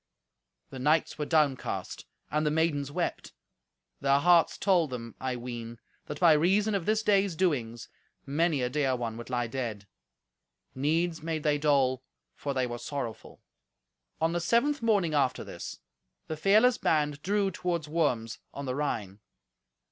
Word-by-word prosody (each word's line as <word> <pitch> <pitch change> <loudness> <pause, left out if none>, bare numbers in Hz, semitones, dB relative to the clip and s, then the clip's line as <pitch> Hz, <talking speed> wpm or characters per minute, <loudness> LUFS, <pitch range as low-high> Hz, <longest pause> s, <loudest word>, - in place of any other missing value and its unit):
The 130 - -7
knights 150 +4 +1
were 150 - -2
downcast, 150 -5 0 0.2
and 150 +1 +1
the 150 - +2
maidens 150 -3 0
wept. - - -3 0.7
Their 140 0 +3
hearts 170 +3 +4
told 180 -6 +2
them, 115 -2 -6
I 130 -1 -2
ween, 120 -1 -6 0.3
that - - -6
by 170 -3 +7
reason 195 +8 +3
of 195 -4 -2
this 215 0 +2
day's 200 -4 +2
doings, 125 -10 -1 0.4
many 145 0 +1
a 125 - 0
dear 135 -2 +1
one 115 -2 -4
would 120 - -8
lie 120 -1 0
dead. 115 -4 -4 0.9
Needs 165 +5 0
made 160 -1 -3
they 150 -1 +2
dole, 135 -3 +2 0.3
for 140 -1 -4
they 130 -1 +1
were 120 -1 -5
sorrowful. 120 -4 -6 0.8
On 160 +1 +1
the 175 0 -1
seventh 235 +11 +2
morning 200 -8 +2
after 135 -3 +1
this, - - -8 0.5
the 160 - -4
fearless 215 +9 +4
band 150 -2 +1
drew 200 +1 +1
towards 170 -3 -2
Worms 145 -8 -1 0.2
on 140 - -5
the 130 - -2
Rhine. 110 -9 -3
150 Hz, 155 wpm, -29 LUFS, 130-170 Hz, 0.9 s, by